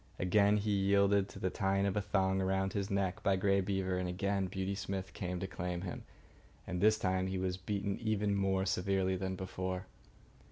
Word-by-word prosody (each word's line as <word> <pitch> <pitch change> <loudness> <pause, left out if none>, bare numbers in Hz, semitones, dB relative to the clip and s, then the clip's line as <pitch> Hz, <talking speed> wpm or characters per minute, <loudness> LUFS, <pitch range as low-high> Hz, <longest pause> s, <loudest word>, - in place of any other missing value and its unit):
Again 100 +3 +4
he 105 0 -1
yielded 100 0 +3
to - - -11
the 95 - -1
tying 100 -1 +1
of 100 - 0
a 105 - +1
thong 95 -1 +1
around 95 0 0
his 100 0 -2
neck 100 -2 -1
by 100 - +3
Grey 100 +1 +2
Beaver, 95 -1 -1
and 90 -1 -2
again 100 +1 0
Beauty 95 +1 -2
Smith 95 -1 -4
came 90 -1 -3
to 95 - -3
claim 90 -1 -4
him. 90 -2 -6 0.6
And 90 -2 -3
this 110 +1 +5
time 95 -2 0
he 95 0 -2
was 95 0 -1
beaten 100 +1 -3
even 105 -2 0
more 95 -1 +1
severely 95 0 +1
than 95 0 -2
before. 95 0 -4
95 Hz, 195 wpm, -34 LUFS, 95-100 Hz, 0.6 s, this